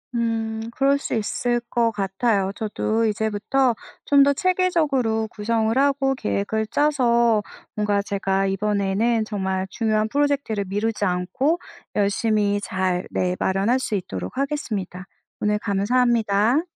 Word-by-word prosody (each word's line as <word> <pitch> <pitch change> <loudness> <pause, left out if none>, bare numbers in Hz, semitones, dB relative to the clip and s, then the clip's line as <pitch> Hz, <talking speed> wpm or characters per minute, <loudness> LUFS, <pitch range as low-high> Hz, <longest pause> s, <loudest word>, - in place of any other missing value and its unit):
음. 225 -1 -1
그럴 275 +2 +3
수 - - -3
있을 240 +2 0
것 230 -1 +2
같아요. 195 0 0
저도 220 +1 -1
이제부터 220 +4 +1 0.3
좀 280 -1 +6
더 280 - +4
체계적으로 295 -11 +1
구성을 220 +1 0
하고 275 -1 +2
계획을 105 - -1
짜서 235 -6 +2 0.3
뭔가 210 -1 +1
제가 195 -1 -1
이번에는 205 +3 0
정말 190 -2 -2
중요한 215 0 0
프로젝트를 280 -5 0
미루지 205 +3 -2
않고 195 - 0 0.4
열심히 205 0 +1
잘 185 -2 -1
네. 180 0 0
마련할 195 +7 +1
수 235 -4 -2
있도록 95 - -5
하겠습니다. 215 - -3 0.4
오늘 210 0 +1
감사합니다. 225 +4 +2
220 Hz, 285 characters per minute, -23 LUFS, 200-245 Hz, 0.4 s, 좀